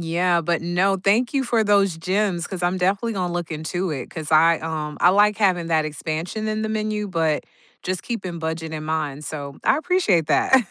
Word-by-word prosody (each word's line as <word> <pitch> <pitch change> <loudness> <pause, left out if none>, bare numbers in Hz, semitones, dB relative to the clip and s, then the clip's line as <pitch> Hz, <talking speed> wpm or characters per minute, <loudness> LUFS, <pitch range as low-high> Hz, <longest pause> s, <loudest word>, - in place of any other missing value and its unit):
yeah, 170 +1 +1
but 170 +1 -1
no, 180 +3 +1
thank 220 +8 +1
you 270 - +2
for 235 -2 +2
those 200 -4 +3
gems 185 0 0
'cause 185 -2 -6
I'm 180 +1 +1
definitely 195 +5 0
gonna 180 -2 -2
look 175 -1 -4
into 165 +3 -3
it 135 -4 -5
'cause 160 -1 -5
I, 165 +1 +5
um 155 -2 -4
I 175 - +7
like 205 +2 +4
having 185 -5 +2
that 160 -2 +2
expansion 160 +8 -4
in 215 0 -2
the 220 - -2
menu, 215 -1 -2
but 160 -4 0 0.4
just 185 0 -3
keeping 190 -8 -4
budget 160 0 -4
in 155 -1 -5
mind, 150 -2 -2
so 140 -2 -6
I - - +4
appreciate 310 - +2
that. 265 - +4
175 Hz, 200 wpm, -22 LUFS, 160-205 Hz, 0.4 s, I